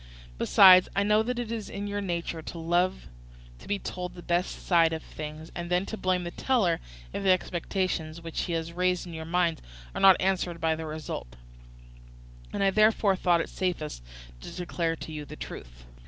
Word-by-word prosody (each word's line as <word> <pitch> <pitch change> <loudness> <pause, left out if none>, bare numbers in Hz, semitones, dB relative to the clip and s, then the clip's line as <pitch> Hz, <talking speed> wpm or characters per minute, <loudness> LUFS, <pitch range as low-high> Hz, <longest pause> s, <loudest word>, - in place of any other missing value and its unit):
Besides 185 -2 +7
I 200 - +3
know 210 +1 +4
that 245 +2 -2
it 240 -2 -3
is 225 -3 -4
your 205 0 -3
nature 170 -3 -3
to 170 - -8
love 175 +3 0 0.5
to - - -14
be 205 - 0
told 180 -2 -6
the 175 - -10
best 175 +1 -1
side 165 -2 +4
of 160 - -4
things, 155 +1 -8
and 170 0 -5
then 180 +2 +1
to 220 - -5
blame 185 -3 0
the 175 - -5
teller 195 -8 +1 0.3
if - - -3
the 195 - +1
expectations 180 -2 0
which 165 -1 -4
he 175 - -3
has 165 0 -3
raised 180 0 0
in 175 - -9
your 160 0 -6
minds 170 -1 +1 0.3
are - - -4
not 190 -1 +8
answered 185 -2 0
by 160 -1 +1
the 160 0 -6
result; 150 - -6 1.2
and - - -1
I 195 - +4
therefore 215 -1 +4
thought 175 -2 +2
it - - -5
safest 170 - -3 0.4
to - - -9
declare 170 -2 -2
to 160 - -8
you 150 -1 -5
the 145 - -10
truth. - - -9
175 Hz, 195 wpm, -28 LUFS, 165-190 Hz, 1.2 s, not